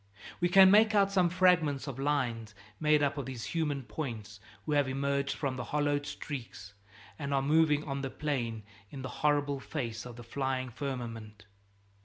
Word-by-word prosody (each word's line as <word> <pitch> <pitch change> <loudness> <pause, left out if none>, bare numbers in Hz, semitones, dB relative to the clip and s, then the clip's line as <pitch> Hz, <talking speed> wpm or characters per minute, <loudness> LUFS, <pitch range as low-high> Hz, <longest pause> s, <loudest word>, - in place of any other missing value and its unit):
We 175 - +2
can 190 +1 +8
make 215 +1 +5
out 200 -1 +4
some 185 -3 +3
fragments 170 -6 +3
of 135 -3 -6
lines 120 -7 -1 0.2
made 150 -1 +3
up 140 0 0
of 135 - -5
these 125 -4 -6
human 150 -5 -2
points 105 -3 -6 0.3
who 155 - -3
have 145 -2 +3
emerged 140 +1 -1
from 135 -3 -2
the 125 - -3
hollowed 145 0 0
streaks 120 -9 -7 0.5
and 140 - -4
are 135 - +2
moving 150 0 +3
on 140 -2 -4
the 135 - -3
plain 120 -8 -3 0.3
in 135 -2 -8
the 130 - -4
horrible 145 -2 +2
face 120 -6 -4
of 120 - -10
the 120 - -10
flying 130 +1 -2
firmament. 115 -6 -6
140 Hz, 175 wpm, -31 LUFS, 125-150 Hz, 0.5 s, can